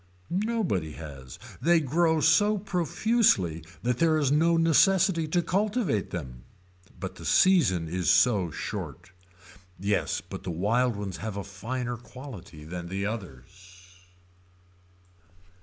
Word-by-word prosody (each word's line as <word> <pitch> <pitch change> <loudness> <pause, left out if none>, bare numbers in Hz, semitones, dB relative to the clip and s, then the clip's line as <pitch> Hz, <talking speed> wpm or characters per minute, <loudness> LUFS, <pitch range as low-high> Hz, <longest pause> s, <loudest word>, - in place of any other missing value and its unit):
Nobody 180 - -1
has. 70 -5 -10 0.2
They 170 +1 +4
grow 160 +2 +1
so 210 +5 +4
profusely 180 - +1 0.2
that 125 0 0
there 160 -1 +3
is 145 -3 +1
no 165 +3 +3
necessity 165 +1 +3
to 175 +3 +1
cultivate 200 - 0
them. 65 -8 -7 0.6
But - - -6
the - - -10
season 130 - +3
is 90 0 -1
so 100 -8 +4
short. 90 +3 -6 0.7
Yes 100 +2 0
but - - -9
the 95 - -6
wild 110 +8 +1
ones 100 -2 -5
have 105 -1 -5
a 100 - -3
finer 120 +6 -4
quality 110 - -11
than 85 +1 -6
the 95 +2 -3
others. 95 - -9
115 Hz, 125 wpm, -27 LUFS, -, 0.7 s, They